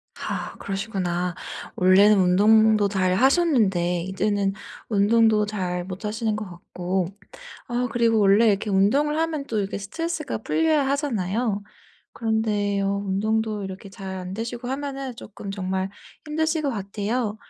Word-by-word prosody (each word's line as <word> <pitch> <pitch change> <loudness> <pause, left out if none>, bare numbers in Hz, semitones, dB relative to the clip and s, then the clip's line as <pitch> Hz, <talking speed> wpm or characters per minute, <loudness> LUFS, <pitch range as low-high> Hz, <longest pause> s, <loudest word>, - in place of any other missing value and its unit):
아 - - -5
그러시구나. 185 -3 -2 0.4
원래는 195 +3 +6
운동도 210 +3 +5
잘 185 -2 +1
하셨는데 220 - +3
이제는 195 +1 0 0.4
운동도 215 0 +4
잘 180 -4 -3
못하시는 210 +4 -3
것 215 0 -4
같고 180 +1 -3 0.6
아 245 +1 -1
그리고 230 -2 +3
원래 205 +3 +5
이렇게 205 +1 +1
운동을 275 +11 +2
하면 320 -3 -1
또 220 - -2
이렇게 200 0 -3
스트레스가 330 - -4
풀려야 315 -3 +1
하잖아요. 225 - -1 0.5
그런데요 205 -3 0
운동도 215 +1 0
이렇게 190 +1 -8
잘 195 -2 -7
안 185 0 -6
되시고 235 +3 -5
하면은 270 -1 -4
쪼끔 205 -2 -9
정말 190 -1 -2 0.4
힘드실 315 +1 0
것 280 - 0
같아요. 210 +1 -2
210 Hz, 310 characters per minute, -24 LUFS, 195-235 Hz, 0.6 s, 원래는